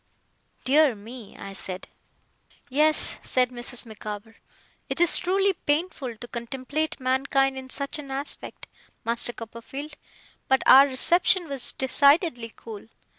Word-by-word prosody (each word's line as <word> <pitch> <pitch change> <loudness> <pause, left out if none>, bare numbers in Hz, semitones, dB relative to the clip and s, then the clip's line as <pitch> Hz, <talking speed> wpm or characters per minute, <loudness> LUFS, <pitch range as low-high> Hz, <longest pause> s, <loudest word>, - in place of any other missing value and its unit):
'Dear 285 -1 +3
me!' 225 +1 -12
I 195 - -9
said. 185 -1 -3 0.8
'Yes,' 305 +3 +3
said 250 -1 0
Mrs. 245 0 -1
Micawber. 215 0 -9 0.5
'It - - -3
is 345 0 +5
truly 390 +2 +1
painful 290 -7 -3
to 240 - -10
contemplate 265 +7 -4
mankind 270 +1 +1
in 260 0 -9
such 280 +4 -2
an 280 -2 -9
aspect, 275 +2 -5 0.4
Master 235 +1 +1
Copperfield, 235 +6 -9 0.5
but 265 0 +2
our 275 +2 +8
reception 345 +6 +3
was, 275 -4 -3
decidedly, 280 - +2
cool. 220 -2 -11
265 Hz, 125 wpm, -25 LUFS, 235-295 Hz, 0.8 s, our